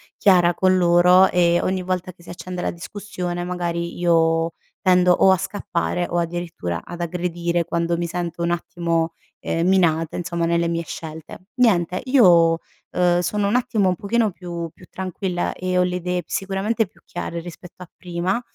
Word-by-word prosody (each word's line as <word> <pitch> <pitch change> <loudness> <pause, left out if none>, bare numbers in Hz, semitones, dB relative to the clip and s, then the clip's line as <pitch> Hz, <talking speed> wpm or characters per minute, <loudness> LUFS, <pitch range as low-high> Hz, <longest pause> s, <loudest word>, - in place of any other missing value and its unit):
chiara 175 -3 +4
con 185 +1 +3
loro, 180 +1 +6
e 175 -1 +3
ogni 185 0 -1
volta 185 0 -3
che 170 - -22
si 170 - -14
accende 180 +1 -6
la - - -1
discussione 180 -1 -5
magari 170 -1 -3
io 165 -1 +2 0.3
tendo, 180 -2 +4
o 190 +1 +5
a 190 - +4
scappare, 190 -1 -2
o 175 - -2
addirittura 170 - -3
ad 175 -1 -7
aggredire, 170 0 -1
quando 170 0 -1
mi 170 - -1
sento 170 0 -4
un 170 - 0
attimo, 170 -1 -1 0.3
ehm, 165 +1 -1
minata, 165 -4 +2
insomma 170 -1 -2
nelle 170 0 +1
mie 170 0 -1
scelte. 160 +3 -9
Niente, 185 -8 +2
io, 175 -11 +5 0.3
uhm, 175 -1 +2
sono 200 +4 0
un 215 - +1
attimo, 215 -6 +1
un 180 - 0
pochino 220 +3 0
più 170 -2 -6
più 180 - -16
tranquilla, 185 -1 -3
e 185 0 -2
ho 180 - +4
le 180 0 -1
idee 180 0 -2
sicuramente 195 +3 -1
più 200 - -26
chiare 170 -1 -5
rispetto 175 +1 -11
a 175 - -15
prima, 180 +4 -2
175 Hz, 170 wpm, -22 LUFS, 170-185 Hz, 0.3 s, loro